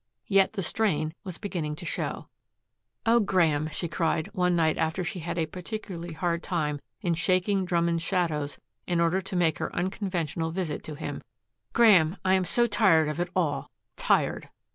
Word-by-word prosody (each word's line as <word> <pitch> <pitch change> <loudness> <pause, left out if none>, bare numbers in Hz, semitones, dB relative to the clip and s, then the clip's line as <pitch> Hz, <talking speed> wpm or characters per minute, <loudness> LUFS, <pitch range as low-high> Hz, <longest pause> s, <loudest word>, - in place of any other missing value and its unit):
Yet 195 -1 +3
the 195 - -2
strain 160 -4 0
was 185 -4 -6
beginning 170 -8 -3
to 170 - -9
show. - - -3 0.8
"Oh, 230 +1 +5
Graeme," 165 -7 +2
she 170 +3 -3
cried, 160 -1 0
one 180 -1 +2
night 160 -2 +3
after 160 +3 0
she 175 +2 -4
had 170 +1 -4
a 165 - +1
particularly 180 0 -6
hard 170 +1 -1
time 150 -6 -1 0.2
in 175 - +1
shaking 185 +3 +1
Drummond's 170 -1 +1
shadows 165 -5 -1 0.3
in 175 -2 +1
order 170 +3 +2
to 190 0 -6
make 170 -3 +2
her - - -2
unconventional 175 -4 -2
visit 165 -3 -3
to 155 - -6
him, 145 - -5 0.5
"Graeme, 195 -7 +5
I'm 185 0 +3
so 240 +7 +3
tired 190 -9 +4
of 150 - -4
it 175 0 -1
all 165 -6 0 0.3
tired." - - +1
175 Hz, 165 wpm, -27 LUFS, 160-190 Hz, 0.8 s, Oh